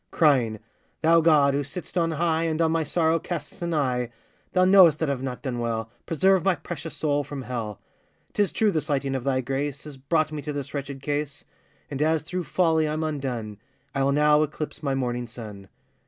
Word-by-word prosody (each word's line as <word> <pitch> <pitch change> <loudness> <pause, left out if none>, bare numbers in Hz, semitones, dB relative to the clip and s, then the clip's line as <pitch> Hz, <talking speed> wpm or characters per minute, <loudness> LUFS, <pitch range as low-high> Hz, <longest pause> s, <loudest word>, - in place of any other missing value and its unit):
Crying, 130 -9 +3 0.5
'Thou, 165 +1 +6
God, 150 -4 +5
who 140 - +1
sitt'st 160 +8 -7
on 170 -2 +2
high, 165 +1 +1
And 160 -1 -1
on 165 -1 +3
my 165 0 +1
sorrow 165 +1 +1
casts 155 -4 -6
an 170 0 -2
eye; 125 -4 0 0.4
Thou 185 0 +4
knowest 185 -5 +7
that 155 -3 0
I've 130 -2 -3
not 130 -2 -5
done 125 -3 -3
well,— 115 -1 -2 0.2
Preserve 190 +3 +3
my 190 -1 +3
precious 165 -2 -7
soul 145 -2 +1
from 140 -1 -6
hell. 115 -5 -4 0.5
''Tis 205 -2 +1
true 215 -2 +2
the 155 - 0
slighting 140 -3 -1
of 130 -2 -2
thy 130 -1 +1
grace, 140 +2 -3
Has 150 -3 -9
brought 155 +3 0
me 150 -1 -4
to 150 +1 -4
this 145 0 -5
wretched 140 -1 -5
case; 145 0 -3 0.5
And 140 0 -3
as 155 -1 +2
through 180 +2 -4
folly 160 -3 +2
I'm 155 +1 -2
undone, 125 -9 -3 0.3
I'll 135 0 +2
now 150 +1 +4
eclipse 155 0 -3
my 140 -3 0
morning 125 -2 -2
sun. 105 -5 -9
145 Hz, 200 wpm, -25 LUFS, 135-160 Hz, 0.5 s, knowest